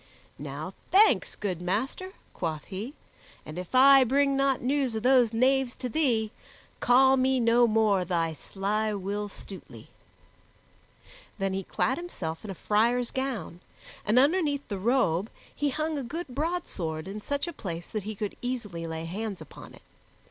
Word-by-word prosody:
"Now - - -6 0.2
thanks, 420 +3 +4
good 185 -5 -3
master," 260 - -2 0.2
quoth 160 -4 -3
he, 215 +10 -6 0.5
"and 155 +3 -6
if 180 +7 -6
I 270 +1 +8
bring 275 +2 +2
not 275 -1 +2
news 265 -2 0
of 220 - -3
those 250 -3 +5
knaves 255 +2 +2
to 250 - -4
thee, 230 -7 +1 0.5
call 265 +2 +5
me 260 0 +2
no 235 +1 +4
more 215 -4 +3
thy 165 -2 0
sly 210 +6 -2
Will 205 +2 -3
Stutely." 195 -1 -11 1.5
Then 195 -2 -1
he 195 - -1
clad 260 - 0
himself 170 - -5
in 215 - -7
a 195 - -5
friar's 235 +6 +1
gown, 250 -11 -3 0.4
and 215 +3 +2
underneath 290 0 +3
the 200 -3 -3
robe 215 -4 +1 0.3
he 290 0 0
hung 310 +2 -2
a - - -4
good 315 +6 -5
broadsword 245 - -3
in 205 +2 -6
such 285 +8 -2
a 345 - -5
place 170 - -6
that 215 - -4
he 215 +2 -6
could 210 -1 -4
easily 210 -10 -4
lay 160 0 -4
hands 200 +3 -4
upon - - -12
it. - - -18
230 Hz, 160 wpm, -28 LUFS, 195-270 Hz, 1.5 s, I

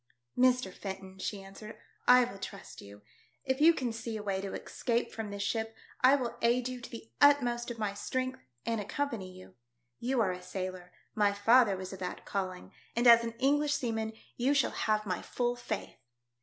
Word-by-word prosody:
" - - -54
Mr. 250 -6 +3
Fenton," 190 -1 -7
she 195 0 -4
answered, 195 +3 -10
" - - -35
I 250 0 +8
will 215 -5 -6
trust 195 0 -8
you. 100 +1 -13 0.4
If 265 +1 0
you 325 +2 +9
can 255 -8 -2
see 225 0 -4
a 210 - -6
way 195 -2 -1
to 195 -1 -5
escape 235 -1 -2
from 220 -2 -5
this 200 0 -4
ship 225 +2 -2 0.3
I 260 +2 +7
will 250 -4 -3
aid 240 +1 +2
you 255 -1 -6
to - - -9
the 225 -1 -10
utmost 245 -5 +4
of 240 - -5
my 210 -2 -1
strength 255 +5 -3 0.3
and 230 -2 0
accompany 215 -4 -3
you. 185 0 -14 0.5
You 255 +1 0
are 195 -4 +2
a 180 0 -6
sailor; 185 -1 -6 0.2
my 205 -1 +3
father 205 0 +5
was 185 0 -6
of 190 - -8
that 180 - -5
calling, 185 -2 -4 0.2
and 240 +1 +1
as 235 -1 +9
an 230 0 -3
English 290 +3 +2
seaman 225 -4 -2 0.2
you 265 +4 +2
shall 275 - +3
have 215 0 0
my 180 -3 -2
full 245 -1 -1
faith." 245 - -5
225 Hz, 200 wpm, -31 LUFS, 195-250 Hz, 0.5 s, you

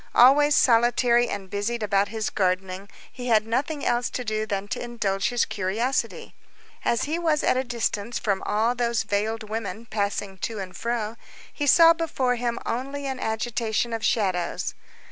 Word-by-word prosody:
Always 285 +4 +6
solitary 240 0 +4
and 195 -1 -5
busied 210 +4 -2
about 200 -1 +2
his 220 -1 -3
gardening, 185 0 -1 0.2
he 250 -1 -7
had 220 -2 +4
nothing 280 +6 -2
else 240 +1 +1
to 250 - -4
do 215 0 -1
than 200 -1 -2
to - - -3
indulge 230 -3 -1
his 245 -2 +1
curiosity. 220 +7 -2 0.5
As 235 - +1
he 315 +4 -1
was 320 -3 +1
at - - +3
a 260 - +1
distance 235 -2 -2
from 200 -3 -1
all 220 +3 +1
those 235 -2 0
veiled 215 +1 -1
women 220 0 -4
passing 200 -3 -3
to 225 +3 -3
and 185 -2 -6
fro, 230 +1 -3 0.4
he 290 - -2
saw 330 +4 +8
before 305 -6 0
him 240 -1 -2
only 275 +4 -3
an 265 -1 -3
agitation 225 0 -1
of 225 -1 -3
shadows. 185 -6 0
230 Hz, 165 wpm, -25 LUFS, 205-245 Hz, 0.5 s, saw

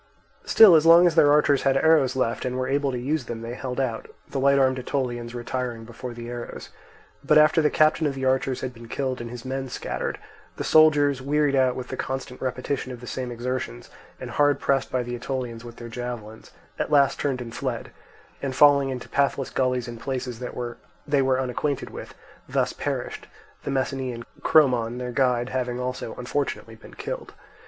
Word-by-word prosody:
Still 215 -5 +8
as 155 -2 +6
long 170 +2 +8
as 175 - +4
their 145 -3 +5
archers 145 -2 +4
had 135 -1 +2
arrows 145 -4 +4
left 120 -2 -1
and 125 0 -2
were 130 0 -1
able 140 0 +1
to 125 - -3
use 140 +3 -1
them, 115 -1 -6
they 115 +1 -5
held 125 0 -4
out, 120 -4 -2 0.2
the 135 - -3
light 140 +1 +4
armed 130 -1 +3
Aetolians 120 -2 -3
retiring 120 -1 -4
before 120 +2 -8
the 120 0 -7
arrows; 120 0 -7 0.5
but 150 +2 +4
after 155 +1 +5
the 150 - +3
captain 155 0 +3
of 140 - -3
the 135 -1 -3
archers 130 0 +1
had 130 -1 -4
been 115 -1 -12
killed 130 0 -3
and 120 - -6
his 120 +1 -9
men 135 0 -3
scattered, - - -4 0.4
the - - -3
soldiers, 145 -3 +4
wearied 145 +1 +1
out 130 -2 +3
with 125 -1 -6
the 130 - -5
constant 130 -1 -5
repetition 130 +1 -3
of 125 - -8
the 125 - -10
same 125 0 -4
exertions 120 - -4 0.3
and - - -7
hard 145 -1 +3
pressed 135 -1 0
by 125 -1 0
the 120 0 -6
Aetolians 120 -2 -4
with 120 -1 -10
their 120 - -9
javelins, 115 -2 -7 0.3
at - - -1
last 140 -2 +3
turned 135 -3 -1
and 120 -2 -7
fled, - - -4 0.5
and 135 -2 -3
falling 140 -1 +6
into 130 -2 -5
pathless 140 -1 0
gullies 125 -2 0
and 120 -1 -7
places 125 -2 -4
that 125 - -6 0.5
they 145 -2 +2
were 130 -1 +2
unacquainted 130 +2 -2
with, - - -9 0.3
thus - - 0
perished, - - -4 0.4
the - - -2
Messenian 130 -3 -2 0.2
Chromon, 125 -6 +3
their 125 0 -4
guide, 125 -1 +1
having 125 -1 -2
also 125 -2 -4
unfortunately 140 +3 -3
been - - -14
killed. - - -6
130 Hz, 195 wpm, -25 LUFS, 120-140 Hz, 0.5 s, Still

